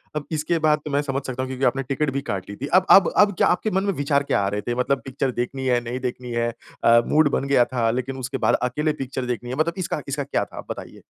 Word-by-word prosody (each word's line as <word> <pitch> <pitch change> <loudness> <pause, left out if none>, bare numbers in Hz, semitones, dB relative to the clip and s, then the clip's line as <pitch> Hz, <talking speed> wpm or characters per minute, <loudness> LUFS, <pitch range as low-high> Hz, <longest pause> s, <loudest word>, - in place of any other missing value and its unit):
अब 150 - -3
इसके 160 +2 0
बाद 155 -1 +3
तो 150 - -4
मैं 140 +1 +2
समझ 135 -1 -2
सकता 130 0 -3
हूँ - - -4
क्योंकि 130 +1 -1
आपने 135 0 +1
टिकट 135 +3 -1
भी 140 - -1
काट 95 0 -4
ली 100 - -6
थी। 135 +6 -5
अब 185 +1 +5
अब 195 - +7
अब 205 0 +5
क्या - - +4
आपके 215 +4 +1
मन 190 +1 +1
में 200 -1 0
विचार 140 -1 +1
क्या 140 - +1
आ 100 - 0
रहे 105 +1 -2
थे? 120 +4 -3
मतलब 135 +2 0
पिक्चर 135 0 -2
देखनी 130 +2 -3
है, 125 -1 +3
नहीं 120 +2 -4
देखनी 125 -1 -5
है। 120 0 0 0.3
अ, 115 0 +6
मूड 155 -1 +4
बन 135 - -1
गया 130 -3 +4
था 120 -3 0
लेकिन 130 +2 -3
उसके 130 +1 -4
बाद - - +2
अकेले 150 +5 0
पिक्चर 130 0 -4
देखनी 120 0 -4
है। 130 - -3
मतलब 160 +4 +1
इसका 170 -4 -2
इसका 140 +1 -2
क्या - - -1
था? - - -15
आप - - -8
बताइए। - - -8
135 Hz, 285 wpm, -23 LUFS, 125-150 Hz, 0.3 s, अब